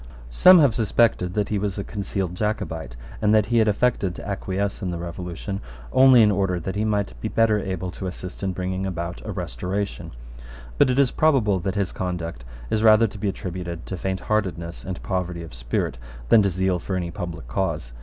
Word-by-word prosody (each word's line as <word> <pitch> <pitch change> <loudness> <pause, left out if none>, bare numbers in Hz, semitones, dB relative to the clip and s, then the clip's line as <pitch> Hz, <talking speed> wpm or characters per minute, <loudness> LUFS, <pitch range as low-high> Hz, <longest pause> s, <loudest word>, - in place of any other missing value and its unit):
Some 185 - +8
have 140 -8 +5
suspected 110 -5 +2
that 105 -1 0
he 105 - 0
was 100 -1 -2
a 100 - -2
concealed 95 -3 -3
Jacobite, 80 - -3 0.3
and 105 0 +4
that 105 -2 +4
he 115 +2 +2
had 110 - +4
affected 105 -4 +1
to - - -8
acquiesce 100 0 -2
in 95 - -2
the 85 - -3
Revolution 90 +3 -5 0.3
only 130 -3 +7
in 105 - +5
order 95 -2 0
that 95 +4 -4
he 105 - 0
might 105 -2 0
be - - -2
better 110 -1 +3
able 95 -2 -3
to 95 - -6
assist 90 0 -7
in 95 -1 -1
bringing 95 +1 -3
about 85 -1 -4
a 110 - -5
Restoration: 90 +4 -4 0.7
but - - +6
it 125 - +1
is 140 -3 +4
probable 125 -11 +3
that 95 +2 -3
his 100 -2 0
conduct 85 -8 -4 0.3
is 110 - +1
rather 110 0 +6
to 105 -1 -6
be 105 - 0
attributed 90 -3 -5
to 95 - -5
faintheartedness 95 -2 -2
and 90 -1 -6
poverty 90 -2 -2
of 80 - -11
spirit - - -2 0.3
than 110 - +7
to 100 - +2
zeal 95 0 0
for 95 - -4
any 90 -2 -2
public 85 -9 -6
cause. - - -2
95 Hz, 200 wpm, -24 LUFS, 90-105 Hz, 0.7 s, Some